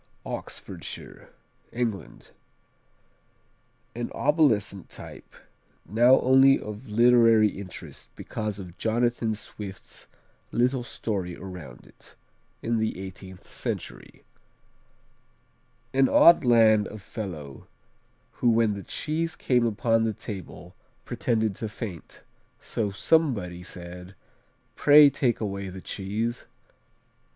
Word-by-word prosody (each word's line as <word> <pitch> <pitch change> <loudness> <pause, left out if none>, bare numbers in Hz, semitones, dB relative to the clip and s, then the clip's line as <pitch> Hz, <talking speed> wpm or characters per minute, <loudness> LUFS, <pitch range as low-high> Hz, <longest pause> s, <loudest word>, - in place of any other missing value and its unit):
Oxfordshire - - -8 0.4
England 115 -5 -4 1.6
An 120 0 -4
obsolescent 125 - +1
type, - - -11 0.6
now 120 +7 +5
only 135 +1 +6
of 105 +3 -8
literary 115 -1 +5
interest 95 -2 -10
because 105 -2 -4
of 90 -3 -10
Jonathan 115 0 0
Swift's 100 -2 -10 0.4
little 125 +2 +1
story 100 -6 -4
around 90 -3 -10
it, - - -18 0.5
in 115 0 0
the 110 -4 -2
eighteenth 95 -1 -10
century: - - -6 1.7
"An 135 0 +4
odd 170 -2 +7
land 110 -4 +5
of 105 - -9
fellow, 85 - -8 0.6
who 120 - +1
when 115 -2 +3
the 100 - -6
cheese 160 +9 -3
came 125 -2 +2
upon 115 +1 +1
the 110 -1 0
table, 95 -3 -9 0.3
pretended 115 -4 -1
to 110 - -4
faint; 105 -7 -8 0.4
so 105 -3 -2
somebody 100 - +1
said, 90 +1 -9 0.6
Pray 145 -1 +7
take 130 -3 0
away 100 -2 -4
the 95 +1 -8
cheese.' 110 +6 -4
110 Hz, 100 wpm, -26 LUFS, 95-120 Hz, 1.7 s, odd